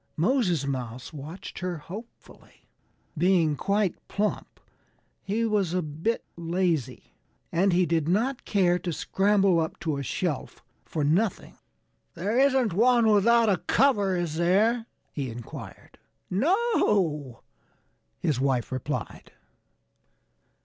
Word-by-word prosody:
Moses 180 Hz, -, +1 dB
Mouse 125 Hz, -1 st, -5 dB
watched 155 Hz, +5 st, -8 dB
her 180 Hz, -1 st, -3 dB
hopefully. 205 Hz, +10 st, -12 dB, 0.5 s
Being 170 Hz, -2 st, +3 dB
quite 200 Hz, +3 st, 0 dB
plump, 210 Hz, +1 st, -3 dB, 0.6 s
he 220 Hz, +4 st, -1 dB
was 200 Hz, -6 st, 0 dB
a 180 Hz, -, 0 dB
bit 160 Hz, +10 st, -2 dB
lazy. 170 Hz, -6 st, -2 dB, 0.4 s
And 185 Hz, +4 st, +2 dB
he 180 Hz, +1 st, +3 dB
did 165 Hz, -2 st, 0 dB
not 240 Hz, +8 st, 0 dB
care 180 Hz, -3 st, +2 dB
to 175 Hz, -, -3 dB
scramble 195 Hz, +1 st, +2 dB
up 160 Hz, -1 st, -3 dB
to 155 Hz, -4 st, -1 dB
a -, -, -3 dB
shelf 145 Hz, +1 st, -3 dB, 0.2 s
for 155 Hz, -, -3 dB
nothing. 180 Hz, +8 st, 0 dB, 0.6 s
"There 210 Hz, +8 st, 0 dB
isn't 265 Hz, -7 st, +3 dB
one 235 Hz, +2 st, +4 dB
without 230 Hz, +3 st, +4 dB
a 195 Hz, -3 st, +3 dB
cover, 205 Hz, -8 st, +2 dB
is 165 Hz, -3 st, -2 dB
there?" 215 Hz, +7 st, +2 dB, 0.3 s
he 135 Hz, -3 st, -3 dB
inquired. 115 Hz, 0 st, -10 dB, 0.3 s
"No!" 195 Hz, -, +1 dB, 0.7 s
his 145 Hz, -5 st, -1 dB
wife 130 Hz, -4 st, 0 dB
replied. 130 Hz, -1 st, -5 dB
180 Hz, 115 wpm, -26 LUFS, 155-215 Hz, 0.7 s, one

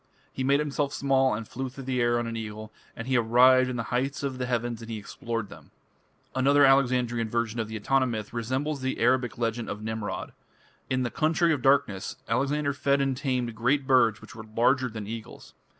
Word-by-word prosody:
"He 130 Hz, -, -3 dB
made 140 Hz, +2 st, +3 dB
himself 145 Hz, -1 st, -1 dB
small 135 Hz, -3 st, +2 dB
and 110 Hz, 0 st, -6 dB
flew 130 Hz, +2 st, -5 dB
through 135 Hz, +2 st, -10 dB
the 130 Hz, -1 st, -1 dB
air 120 Hz, 0 st, +2 dB
on 120 Hz, -, -1 dB
an 115 Hz, 0 st, -4 dB
eagle, 110 Hz, -1 st, -7 dB, 0.2 s
and 115 Hz, -, -7 dB
he 130 Hz, -, +1 dB
arrived 125 Hz, +2 st, +5 dB
in 125 Hz, -, -3 dB
the 115 Hz, -, -2 dB
heights 135 Hz, +3 st, -1 dB
of 135 Hz, -2 st, -3 dB
the 125 Hz, -, -2 dB
heavens 120 Hz, -1 st, -2 dB
and 115 Hz, -, -9 dB
he 115 Hz, -, -4 dB
explored 115 Hz, +1 st, -5 dB
them." -, -, -13 dB, 0.6 s
Another 140 Hz, +2 st, +4 dB
Alexandrian 125 Hz, -4 st, +2 dB
version 115 Hz, 0 st, -1 dB
of 110 Hz, -, -1 dB
the 110 Hz, -, -7 dB
Etana 130 Hz, +5 st, +1 dB
myth 110 Hz, -3 st, -5 dB
resembles 130 Hz, +5 st, -2 dB
the 130 Hz, 0 st, -2 dB
Arabic 125 Hz, 0 st, +2 dB
legend 115 Hz, 0 st, -2 dB
of 105 Hz, -, -5 dB
Nimrod. 110 Hz, -1 st, -4 dB, 0.6 s
"In 130 Hz, 0 st, 0 dB
the 120 Hz, -, -2 dB
Country 165 Hz, +2 st, +2 dB
of 140 Hz, -, -2 dB
Darkness" 115 Hz, -8 st, +2 dB
Alexander 140 Hz, +4 st, 0 dB
fed 140 Hz, 0 st, +1 dB
and 135 Hz, -1 st, +1 dB
tamed 125 Hz, -3 st, -2 dB
great 130 Hz, +5 st, +1 dB
birds 120 Hz, -5 st, +3 dB
which -, -, -12 dB
were 110 Hz, -2 st, -9 dB
larger 125 Hz, +4 st, +1 dB
than 110 Hz, -2 st, -6 dB
eagles. 110 Hz, +1 st, -9 dB
125 Hz, 205 wpm, -27 LUFS, 115-135 Hz, 0.6 s, arrived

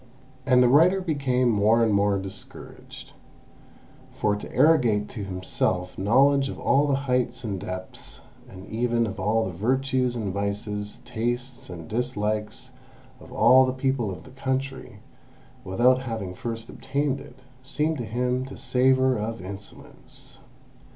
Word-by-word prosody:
And 125 Hz, -1 st, +5 dB
the -, -, +5 dB
writer 165 Hz, +9 st, +5 dB
became 135 Hz, -8 st, +1 dB
more 110 Hz, +2 st, +3 dB
and 110 Hz, -2 st, +2 dB
more 100 Hz, 0 st, +2 dB
discouraged, 95 Hz, +1 st, -10 dB, 1.0 s
for 105 Hz, -1 st, 0 dB
to 105 Hz, -, -8 dB
arrogate 125 Hz, -8 st, +3 dB
to 110 Hz, -5 st, -6 dB
himself 90 Hz, -1 st, -2 dB
knowledge 135 Hz, +7 st, +3 dB
of -, -, -7 dB
all 140 Hz, +2 st, +3 dB
the 140 Hz, -, +2 dB
heights 125 Hz, -1 st, 0 dB
and 100 Hz, -4 st, -3 dB
depths, 95 Hz, -1 st, -8 dB, 0.3 s
and 95 Hz, 0 st, -11 dB
even 115 Hz, +1 st, 0 dB
of 105 Hz, -2 st, -6 dB
all 110 Hz, +2 st, +1 dB
the 95 Hz, -, -4 dB
virtues 130 Hz, +5 st, 0 dB
and 105 Hz, -5 st, -3 dB
vices, 105 Hz, +1 st, -4 dB
tastes 120 Hz, +2 st, -4 dB
and 85 Hz, -3 st, -8 dB
dislikes 110 Hz, -2 st, -3 dB, 0.5 s
of -, -, -14 dB
all 130 Hz, +1 st, +6 dB
the 130 Hz, -1 st, 0 dB
people 130 Hz, -4 st, -1 dB
of 90 Hz, -4 st, -7 dB
the 130 Hz, -, -14 dB
country, 135 Hz, 0 st, -4 dB, 0.6 s
without 125 Hz, +7 st, +3 dB
having 110 Hz, -7 st, -5 dB
first 115 Hz, +2 st, -6 dB
obtained 140 Hz, -1 st, -2 dB
it, 135 Hz, -2 st, -13 dB, 0.2 s
seemed 150 Hz, +3 st, -1 dB
to 120 Hz, -, -3 dB
him 125 Hz, +3 st, -1 dB
to 135 Hz, -, -10 dB
savour 130 Hz, 0 st, +2 dB
of 115 Hz, +2 st, -4 dB
insolence. 95 Hz, +2 st, -11 dB
120 Hz, 145 wpm, -25 LUFS, 105-130 Hz, 1.0 s, all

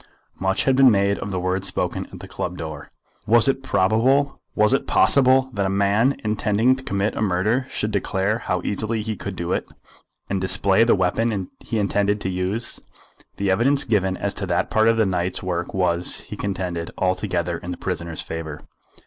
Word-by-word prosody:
Much 95 Hz, +1 st, 0 dB
had 135 Hz, -, +3 dB
been 135 Hz, -1 st, +7 dB
made 100 Hz, -2 st, +2 dB
of -, -, -5 dB
the 95 Hz, -2 st, -2 dB
words 95 Hz, +2 st, -1 dB
spoken 90 Hz, -, -2 dB
at -, -, -10 dB
the -, -, -9 dB
club 90 Hz, -, -5 dB
door. 80 Hz, -1 st, -7 dB, 0.4 s
Was 115 Hz, +3 st, +5 dB
it 135 Hz, 0 st, +1 dB
probable, 135 Hz, +6 st, +2 dB
was 105 Hz, +4 st, +4 dB
it 135 Hz, -, 0 dB
possible, 130 Hz, -1 st, +4 dB
that 100 Hz, -1 st, 0 dB
a -, -, -1 dB
man 100 Hz, +7 st, +2 dB
intending 110 Hz, +3 st, +2 dB
to 130 Hz, -, -9 dB
commit 100 Hz, -4 st, -1 dB
a -, -, -3 dB
murder 105 Hz, +6 st, +1 dB
should 105 Hz, -, -2 dB
declare 100 Hz, +2 st, 0 dB
how 90 Hz, -5 st, -2 dB
easily 110 Hz, +2 st, -2 dB
he 110 Hz, 0 st, -3 dB
could 100 Hz, -1 st, -6 dB
do 85 Hz, 0 st, -4 dB
it, -, -, -3 dB, 0.6 s
and 95 Hz, -1 st, -2 dB
display 95 Hz, +3 st, +3 dB
the 115 Hz, -, +4 dB
weapon 95 Hz, +1 st, -1 dB
he 115 Hz, -, -4 dB
intended 105 Hz, 0 st, +1 dB
to 95 Hz, -, -2 dB
use? 95 Hz, +5 st, -2 dB, 0.6 s
The 100 Hz, -1 st, 0 dB
evidence 135 Hz, +8 st, +3 dB
given 95 Hz, -4 st, 0 dB
as -, -, -1 dB
to -, -, -4 dB
that -, -, 0 dB
part 110 Hz, 0 st, +3 dB
of 115 Hz, 0 st, +3 dB
the 110 Hz, -, +3 dB
night's 90 Hz, -1 st, -1 dB
work 90 Hz, -2 st, -3 dB
was, 90 Hz, -2 st, +1 dB
he -, -, -9 dB
contended, 90 Hz, -4 st, -3 dB
altogether 90 Hz, -2 st, -1 dB
in 90 Hz, -, -8 dB
the 90 Hz, -, -4 dB
prisoner's 85 Hz, -3 st, -4 dB
favour. 80 Hz, -2 st, -6 dB
100 Hz, 190 wpm, -22 LUFS, 90-115 Hz, 0.6 s, been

